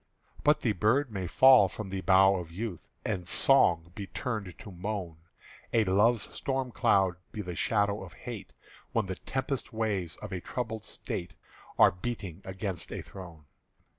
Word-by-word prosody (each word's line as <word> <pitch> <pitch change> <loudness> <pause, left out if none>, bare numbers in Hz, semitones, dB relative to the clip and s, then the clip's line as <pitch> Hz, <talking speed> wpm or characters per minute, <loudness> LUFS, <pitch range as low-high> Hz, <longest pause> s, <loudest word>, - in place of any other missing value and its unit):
But 150 +1 +4
the 115 - +2
bird 115 +7 +2
may 95 -3 -3
fall 130 +1 +7
from 95 +1 -7
the 95 -1 -3
bough 95 +1 +5
of 85 -2 -6
youth, 95 -3 -6 0.2
And 95 -5 -2
song 85 - +4
be 100 0 -6
turned 110 -6 -4
to 100 - -10
moan, 90 -2 -4 0.5
And 110 -3 +3
Love's 115 +2 +4
storm 135 -2 -2
cloud 95 -5 +3
be 105 - -5
the 90 -1 -5
shadow 105 0 +1
of 90 -2 -11
Hate, 115 +2 -8 0.4
When 115 -3 +1
the 95 -1 -5
tempest 130 0 -3
waves 105 -7 -1
of - - -8
a 90 -1 -4
troubled 110 -1 -4
State 85 - -5 0.4
Are - - +7
beating 95 -2 -5
against 95 -1 -4
a - - -5
throne. 85 -5 -11
100 Hz, 165 wpm, -30 LUFS, 90-115 Hz, 0.5 s, fall